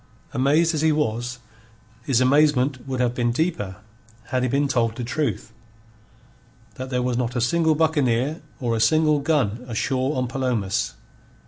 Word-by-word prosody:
Amazed 150 +6 +3
as 155 - -1
he 160 0 +3
was, 125 -4 -1 0.7
his 130 -2 +2
amazement 135 -1 +2
would 130 -1 -3
have 125 -1 +1
been 120 -1 0
deeper 120 - -1 0.5
had 130 - 0
he 130 - 0
been 140 +3 +1
told 115 -4 0
the 125 - -4
truth: 115 -4 -2 1.2
that 130 0 -7
there 125 -1 -1
was 125 -1 -1
not 125 0 -2
a - - +1
single 160 +6 +2
buccaneer 145 -2 +1 0.2
or 120 -4 -1
a - - -1
single 155 +4 +3
gun 135 -7 0
ashore 130 +4 -1
on 125 -1 0
Palomas. 120 -7 -1
130 Hz, 155 wpm, -23 LUFS, 120-150 Hz, 1.2 s, Amazed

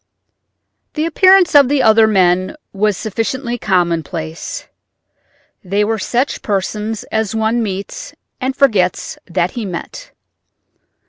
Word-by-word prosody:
The 305 0 0
appearance 370 +2 +5
of 285 -3 +6
the 280 -2 +2
other 220 0 +5
men 185 -2 +2 0.2
was 205 -1 0
sufficiently 235 +3 -3
commonplace; 170 -4 -2 1.0
they 200 +2 0
were 220 0 -1
such 250 +7 -1
persons 210 +2 -2
as 220 -1 -1
one 220 +2 +1
meets 200 - -5 0.2
and 260 0 -2
forgets 210 -10 +1
that 175 0 -1
he 240 - -5
met. 180 -4 -7
215 Hz, 115 wpm, -16 LUFS, 185-245 Hz, 1.0 s, of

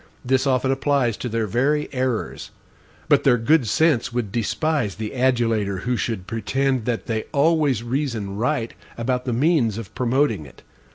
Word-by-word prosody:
This 130 +2 +2
often 130 0 +2
applies 135 -4 +1
to 125 - -4
their 115 0 -1
very 135 +8 +1
errors. 130 -3 -2 0.6
But - - +4
their 130 -3 +4
good 130 +2 +3
sense 145 +2 +2
would 120 -4 -2
despise 120 - -1
the 110 0 -5
adulator 115 -7 +1
who 125 +3 -1
should 110 -6 -3
pretend 130 +4 -1
that 120 -2 -2
they 110 -2 -2
always 145 -5 +2
REASON 120 -6 -2
RIGHT 115 +1 -1 0.2
about 125 +2 -1
the 125 - -1
MEANS 125 - +2
of 115 -4 -8
promoting 125 - 0
it. - - -17
125 Hz, 160 wpm, -22 LUFS, 115-135 Hz, 0.6 s, But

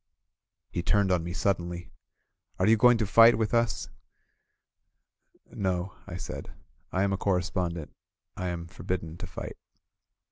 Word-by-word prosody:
He 85 - -1
turned 100 +1 +2
on 90 -3 +2
me 85 - -4
suddenly: 85 -2 -1 0.7
"Are 95 - +2
you 110 +2 +6
going 120 +2 +6
to 110 - 0
flght 115 +4 +7
with 110 0 -1
us?" 115 -1 +1 1.6
"No," 95 -1 -2
I - - -5
said. - - -7 0.4
"I 95 - +1
am 100 0 +1
a - - 0
correspondent. 90 -4 -1 0.4
I 90 - -3
am 85 -1 -3
for 85 - -13
bidden 85 -3 -3
to 90 0 -6
fight." 90 - -7
95 Hz, 145 wpm, -28 LUFS, 85-100 Hz, 1.6 s, flght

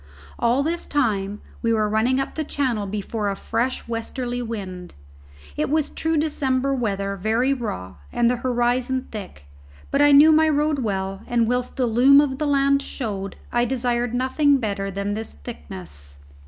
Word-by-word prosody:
All 240 +4 +2
this 335 +3 -2
time 210 -7 0 0.2
we 230 - +1
were 215 -2 +2
running 225 +5 +2
up 270 - -3
Channel 240 -8 -1
before 205 +1 -2
a 200 - -2
fresh 235 +6 -2
westerly 240 +2 -3
wind. 190 -6 -6 0.6
It - - -1
was 305 0 +1
true 320 0 -1
December 275 -3 0
weather, 200 -6 -1
very 225 +7 +1
raw, 95 - -5
and 240 - +2
the 245 +1 +2
horizon 250 +1 0
thick, 190 - -8 0.5
but 280 - +2
I 290 0 +6
knew 295 +3 +8
my 315 0 +5
road 300 0 +1
well, 195 -4 -2
and 235 -2 +2
whilst 250 +1 -1
the 255 - +2
loom 250 +5 +6
of 275 -2 +1
the 300 - 0
land 275 0 +3
showed, 200 -8 -5 0.2
I 240 0 +2
desired 245 -1 -1
nothing 275 +3 +3
better 200 -5 -2
than 200 +1 -3
this 220 +1 -5
thickness. 70 -1 -9
240 Hz, 165 wpm, -23 LUFS, 205-270 Hz, 0.6 s, knew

